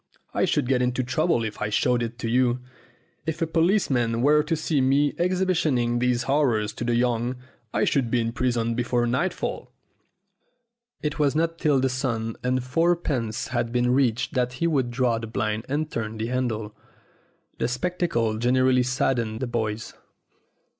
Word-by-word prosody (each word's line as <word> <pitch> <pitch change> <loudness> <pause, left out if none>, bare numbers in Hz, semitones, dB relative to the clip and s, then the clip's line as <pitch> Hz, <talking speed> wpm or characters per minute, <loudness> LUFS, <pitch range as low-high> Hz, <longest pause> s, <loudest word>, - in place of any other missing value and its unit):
I - - +2
should - - 0
get 130 -1 +2
into 125 +1 0
trouble 130 0 +1
if 110 -1 -5
I 105 - 0
showed 120 +3 +2 0.2
you 125 +2 +3
it. 120 +1 -2 0.7
If 160 +1 -2
a 165 - +1
policeman 155 - +1
were 150 +2 +5
to 165 +2 -1
see 155 -2 0
me 140 +2 +3
exhibiting 170 -10 +1
these 125 0 +1
horrors 120 -6 +1
to - - -5
the 120 0 +1
young, 120 0 +1 0.4
I - - +1
should 130 -4 +1
be 120 - +2
in 115 0 -1
prison 120 -2 0
before 120 0 0
nightfall." 130 +10 -2 1.3
It 150 0 -2
was 145 -1 +2
not 165 +1 0
till 150 -4 +3
the 130 - +2
sum 120 -4 -2
of 125 0 0
fourpence 140 -6 0
had 120 -2 -1
been 125 0 +2
reached 125 0 +1
that 125 -2 0
he 140 +6 -2
would 140 -7 +1
draw 120 -1 +1
up - - -5
the 115 - -5
blind 110 0 -2
and 150 +2 -1
turn 110 -1 -4
the 110 - -2
handle. 110 -4 -2 0.8
The - - +1
spectacle 125 -5 -1
generally 130 +1 +3
saddened 125 -3 0
the 130 - -1
boys. 110 -2 -3
125 Hz, 165 wpm, -25 LUFS, 115-145 Hz, 1.3 s, were